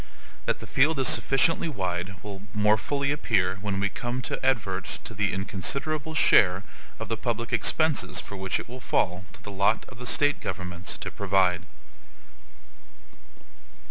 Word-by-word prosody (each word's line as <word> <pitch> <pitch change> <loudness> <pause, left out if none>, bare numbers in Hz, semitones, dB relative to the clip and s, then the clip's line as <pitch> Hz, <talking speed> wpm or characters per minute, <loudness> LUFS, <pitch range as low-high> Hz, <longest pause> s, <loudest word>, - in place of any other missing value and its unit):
That - - +1
the - - -9
field 150 +4 +3
is 135 - +2
sufficiently 160 +5 +3
wide 95 - -3
will 100 -2 -7
more 105 0 +5
fully 140 +6 -1
appear 95 -10 +1
when 100 -2 -2
we 100 - +2
come 125 +3 -4
to - - -3
advert 105 -8 +1 0.2
to - - -7
the 100 -1 0
inconsiderable 140 - -2
share 95 - +5 0.3
of 115 - -5
the 115 +1 -2
public 115 -1 -2
expenses 155 -2 +2
for 100 - -7
which 95 -1 -1
it - - -7
will 125 +2 -9
fall 90 -5 0
to - - -14
the 105 - -7
lot 100 +3 +2
of 130 - -13
the 125 - -5
State 145 +2 +2
governments 90 -1 -4
to - - -5
provide. 95 -2 +2
105 Hz, 160 wpm, -27 LUFS, 95-130 Hz, 0.3 s, more